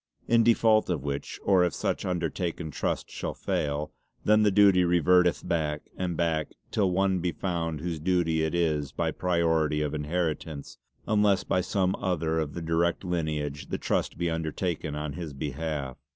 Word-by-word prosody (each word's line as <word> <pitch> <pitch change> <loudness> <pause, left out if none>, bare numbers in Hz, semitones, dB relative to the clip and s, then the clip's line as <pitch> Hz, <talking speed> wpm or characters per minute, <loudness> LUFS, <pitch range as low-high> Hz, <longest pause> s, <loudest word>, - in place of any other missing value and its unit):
In 115 0 +5
default 110 -2 +4
of 80 -7 -1
which, 70 -1 -4
or 95 -2 +4
if 85 -5 0
such - - -2
undertaken 85 -2 -2
Trust - - -2
shall - - -4
fail, 75 +1 -2 0.3
then 105 +1 +5
the 105 - +5
duty 100 -2 +5
reverteth 90 +1 +3
back 75 -4 -1
and 90 -3 -2
back 80 -3 0 0.2
till 100 -3 +2
one 95 0 +1
be 90 0 -1
found 85 -5 -3
whose 85 -2 -3
duty 85 -1 +1
it 80 +2 0
is 75 -5 0
by - - -1
priority 80 -4 +1
of 75 0 -2
inheritance, 80 -1 -3 0.3
unless 105 -3 +3
by 90 - +1
some 95 0 0
other 80 -3 0
of 75 -2 -3
the 85 - -4
direct 85 +2 +1
lineage 75 -5 -2
the - - -2
Trust - - -1
be 85 - 0
undertaken 80 -1 -2
on 75 -1 -4
his 80 -2 -6
behalf. 70 -1 -4
85 Hz, 165 wpm, -28 LUFS, 75-90 Hz, 0.3 s, In